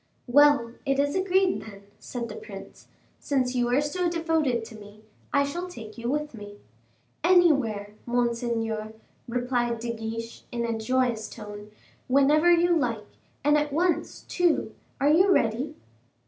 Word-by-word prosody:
"Well, 275 -3 +4
it 275 -1 0
is 285 +1 +1
agreed, 375 0 +2
then," 200 -2 -11 0.2
said 240 -2 -5
the - - -8
prince; 450 0 -11 0.3
"since 260 -3 0
you 245 -1 +1
are 250 +4 +2
so 345 +4 -1
devoted 320 -8 0
to 220 - -11
me, 210 0 -14 0.3
I 280 - +3
shall 345 +6 -4
take 225 -11 -10
you 235 0 -4
with 300 +1 -2
me." 205 -2 -10 0.7
"Anywhere, 275 - +3
monseigneur," 235 -2 -1 0.3
replied 245 -1 -1
De 235 0 -3
Guiche 230 +1 -6
in 235 -1 -2
a 230 -1 -1
joyous 235 -1 0
tone, 210 -1 -9 0.4
"whenever 290 +6 +4
you 345 0 +4
like, 230 -8 -1 0.4
and 295 +1 +4
at 295 0 -2
once, 340 +4 0
too. 350 -3 0 0.3
Are 285 +2 +4
you 370 +5 +5
ready?" 255 +1 +1
250 Hz, 145 wpm, -26 LUFS, 230-300 Hz, 0.7 s, you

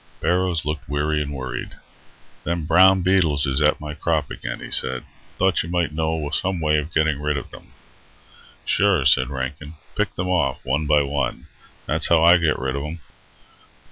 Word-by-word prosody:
Barrows 90 -3 +1
looked 75 -3 -4
weary 75 +1 0
and 75 -1 -4
worried. 65 -3 -6 0.7
"Them 85 -2 -2
brown 95 +3 +5
beetles 85 -7 +4
is 70 +1 +1
at 75 +1 +3
my 75 0 -6
crop 80 -2 -1
again," - - -6
he - - -9
said. 65 -1 -1 0.3
"Thought 95 -1 +2
you 85 - -7
might 85 -2 0
know 80 -1 -2
some 95 +2 -1
way 75 -1 +2
of 75 +3 -6
getting 80 -2 +1
rid 75 -1 -1
of - - -7
them." - - -9 0.9
"Sure," 100 -9 +2
said 65 0 +4
Rankin. 70 +3 -6 0.2
"Pick - - -1
them 90 - -3
off, 90 -2 0
one 75 +3 -1
by 75 0 +4
one. 70 -2 -3 0.4
That's 80 +2 0
how 80 -1 +4
I 85 +1 +7
get 80 -3 +1
rid 65 +1 -3
of 70 - -3
them." 75 +3 -6
75 Hz, 180 wpm, -22 LUFS, 70-85 Hz, 0.9 s, I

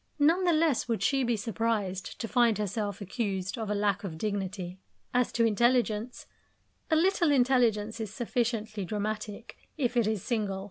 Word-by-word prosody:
None 330 +5 +3
the 350 - +4
less 310 -6 +2
would 230 -2 -1
she 275 -1 +2
be 240 -2 +1
surprised 210 -4 -2
to 225 - -3
find 235 -2 +3
herself 205 0 -3
accused 195 -2 -2
of 220 -4 -4
a 210 - 0
lack 200 -1 0
of 170 -5 -5
dignity. 190 -2 -3 0.3
As 250 -1 +2
to 230 - +3
intelligence 235 0 +1 0.6
a 320 - +4
little 345 0 +3
intelligence 240 -5 +2
is 220 -3 -4
sufficiently 225 -3 -2
dramatic, 215 +2 -4 0.2
if 250 -4 0
it 235 -3 +3
is 215 -4 -1
single. 210 -5 -1
220 Hz, 160 wpm, -29 LUFS, 205-245 Hz, 0.6 s, the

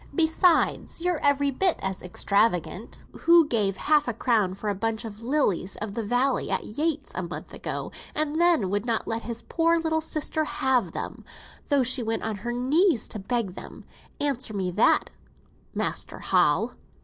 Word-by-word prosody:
Besides, 330 0 +2
you're 350 -2 0
every 285 0 +2
bit 365 +6 +2
as 190 -1 -3
extravagant. 200 +2 0 0.2
Who 335 -2 +6
gave 205 -7 +1
half 300 -2 +2
a 240 - -2
crown 215 -6 +1
for 210 - -6
a - - 0
bunch 220 +3 -2
of 215 0 -8
lilies 230 - 0
of 210 -1 -5
the 230 - -3
valley 250 +5 +1
at - - 0
Yates', 300 +5 -2
a - - -3
month 175 -1 -7
ago, - - -5 0.2
and 310 +1 0
then 330 - +3
would 205 0 0
not 230 -2 -1
let 225 0 -2
his 235 0 -5
poor 335 0 +2
little 320 -1 0
sister 310 0 -1
have 265 -4 0
them, - - -6 0.5
though 285 -3 +3
she 255 +1 +1
went 225 -1 -2
on 220 -2 -2
her 235 +5 -4
knees 265 - +2
to 215 - -5
beg 210 -1 -2
them? - - -10 0.3
Answer 260 -6 -1
me 185 -2 -1
that, 210 +6 +3 0.6
Master - - -2
Hal." - - +2
245 Hz, 175 wpm, -26 LUFS, 210-305 Hz, 0.6 s, Who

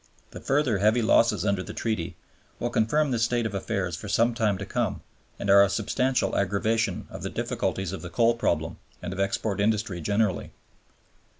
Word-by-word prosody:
The - - -9
further 135 -7 +1
heavy 110 +4 +3
losses 115 0 +3
under 100 -2 +1
the - - -8
Treaty 110 -8 -2 0.4
will 120 - -2
confirm 140 +7 +2
this 120 -2 0
state 120 0 +1
of 110 - -3
affairs 95 -3 -2
for 100 +4 -8
some 115 +4 +3
time 105 -4 +1
to 100 - -5
come, - - -2 0.4
and - - -5
are 100 0 +7
a 100 - +2
substantial 125 +5 0
aggravation 100 +1 0
of - - -8
the - - -3
difficulties 95 -2 -2
of 95 - -6
the 85 - -7
coal 115 +7 +3
problem 85 -8 -1 0.3
and 90 - -4
of 95 - -7
export 100 +1 -1
industry 105 -4 0
generally. 100 +1 0
105 Hz, 185 wpm, -26 LUFS, 95-115 Hz, 0.4 s, are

